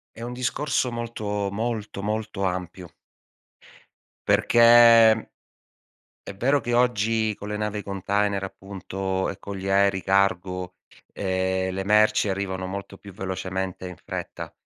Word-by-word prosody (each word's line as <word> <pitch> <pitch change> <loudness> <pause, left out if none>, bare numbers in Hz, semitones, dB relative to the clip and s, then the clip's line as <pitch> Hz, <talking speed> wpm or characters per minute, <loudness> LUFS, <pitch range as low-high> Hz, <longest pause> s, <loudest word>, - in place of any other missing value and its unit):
È 115 - -10
un 120 +1 -5
discorso 125 +1 -1
molto, 105 -4 -3
molto, 110 -2 -3
molto 110 -1 -3
ampio. 90 -1 -3 1.4
Perché 120 - +2 1.6
è 100 - -8
vero 135 +7 +2
che 120 -2 -3
oggi 110 -3 +1
con 105 - -8
le 105 - -3
navi 105 -1 -3
container 100 0 -1
appunto 95 0 -4
e 100 - -6
con 100 0 -7
gli 95 +1 -4
aerei 100 -1 +3
cargo, 90 -1 0 0.4
ehm, 95 -1 -1
le 95 0 -3
merci 105 0 +3
arrivano 95 -1 -3
molto 100 +1 -7
più 100 -2 -13
velocemente 95 0 -4
e - - -5
in 90 - -10
fretta, - - -6
100 Hz, 130 wpm, -24 LUFS, 95-110 Hz, 1.6 s, aerei